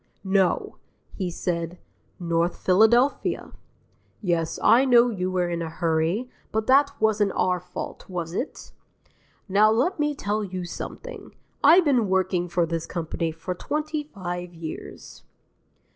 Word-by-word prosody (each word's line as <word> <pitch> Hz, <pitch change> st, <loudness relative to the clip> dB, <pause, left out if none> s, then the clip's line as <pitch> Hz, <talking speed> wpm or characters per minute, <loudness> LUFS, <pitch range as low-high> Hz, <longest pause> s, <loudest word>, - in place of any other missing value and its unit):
No; 190 Hz, -2 st, +1 dB, 0.4 s
he 185 Hz, -3 st, -3 dB
said 170 Hz, 0 st, -3 dB, 0.4 s
'North 170 Hz, 0 st, 0 dB
Philadelphia.' 235 Hz, +8 st, +3 dB, 0.7 s
Yes, 170 Hz, -5 st, -1 dB
I 245 Hz, +3 st, +6 dB
know 245 Hz, -2 st, +5 dB
you 185 Hz, -3 st, -2 dB
were 180 Hz, -1 st, 0 dB
in 170 Hz, -1 st, -2 dB
a 165 Hz, -, -3 dB
hurry, 165 Hz, +7 st, 0 dB, 0.2 s
but 220 Hz, 0 st, -1 dB
that 280 Hz, +3 st, +3 dB
wasn't 210 Hz, -2 st, +2 dB
our 180 Hz, -1 st, +1 dB
fault, 180 Hz, -, -8 dB
was 170 Hz, -2 st, -4 dB
it? 255 Hz, -, -5 dB, 0.8 s
Now, 205 Hz, +2 st, +5 dB
let 250 Hz, -, +1 dB
me 295 Hz, 0 st, +1 dB
tell 210 Hz, -4 st, -2 dB
you 185 Hz, -2 st, -5 dB
something: 485 Hz, -, -8 dB, 0.3 s
I've 330 Hz, +5 st, +7 dB
been 245 Hz, -8 st, +2 dB
working 185 Hz, -2 st, +1 dB
for 170 Hz, 0 st, +1 dB
this 165 Hz, 0 st, -3 dB
company 165 Hz, -1 st, -3 dB
for 165 Hz, +3 st, -5 dB
twenty 305 Hz, -, -3 dB
five 180 Hz, -, -6 dB
years...." 165 Hz, -1 st, -8 dB
185 Hz, 135 wpm, -25 LUFS, 175-235 Hz, 0.8 s, I've